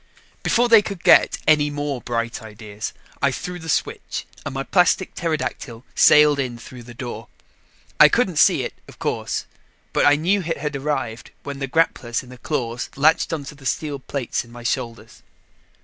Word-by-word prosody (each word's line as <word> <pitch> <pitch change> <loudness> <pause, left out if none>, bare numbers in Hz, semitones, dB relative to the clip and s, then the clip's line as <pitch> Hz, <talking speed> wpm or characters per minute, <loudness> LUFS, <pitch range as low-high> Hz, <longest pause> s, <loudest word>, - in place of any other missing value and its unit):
Before 240 +1 +2
they 230 -2 +7
could 200 -4 -7
get - - +6
any 150 -1 +4
more 145 -3 -3
bright 115 0 -3
ideas, 105 -1 -7 0.3
I - - +4
threw 180 0 -5
the 160 -1 -8
switch - - -2 0.2
and - - -4
my 135 0 -3
plastic 180 +3 +2
pterodactyl 145 -7 -4
sailed 150 -1 +6
in 125 -3 -2
through 125 +1 -11
the 120 0 -12
door. 120 0 -7 0.7
I - - +9
couldn't - - +1
see - - +5
it, - - -5
of - - -14
course, - - -2 0.5
but - - +3
I 145 - +6
knew 185 +7 +1
it 165 -1 -3
had 150 0 -4
arrived 135 -5 -3
when 140 -1 -6
the 135 - -2
grapples 130 -6 0
in 125 - -15
the 125 -1 -12
claws 120 -3 -3
latched 155 +5 +3
onto 150 -3 -4
the 140 -2 -8
steel 145 +2 -2
plates 130 -1 -3
on 120 - -18
my 120 0 -11
shoulders. 115 -2 -4
140 Hz, 180 wpm, -22 LUFS, 120-155 Hz, 0.7 s, I